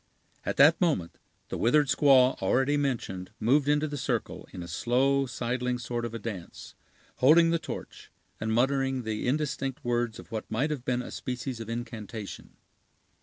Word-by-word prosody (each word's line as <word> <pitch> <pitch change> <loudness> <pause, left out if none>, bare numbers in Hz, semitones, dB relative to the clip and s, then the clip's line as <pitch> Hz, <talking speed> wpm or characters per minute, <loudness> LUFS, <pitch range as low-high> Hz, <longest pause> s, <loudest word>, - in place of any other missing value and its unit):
At - - -3
that 145 +6 +6
moment, 145 - 0 0.3
the - - -4
withered 145 +6 +4
squaw 130 -2 +5
already 135 +3 +2
mentioned 120 -10 -2
moved 135 +6 +3
into 150 +1 +2
the 145 -1 -5
circle, - - -3
in 90 - -7
a - - -8
slow, 130 +9 +1
sidling 125 +1 -2
sort 120 0 -3
of 115 -1 -5
a - - -1
dance, 100 -6 -7 0.4
holding 165 +5 +6
the 170 - +2
torch, - - -8 0.3
and 110 +1 -2
muttering 135 +2 +1
the 110 +1 -3
indistinct 135 0 -2
words 120 -2 0
of - - -12
what 110 -1 -5
might 135 +8 0
have 140 -5 -3
been 125 -1 -1
a - - -8
species 125 -1 -4
of 115 -1 -7
incantation. 115 -3 -6
125 Hz, 170 wpm, -28 LUFS, 115-140 Hz, 0.4 s, that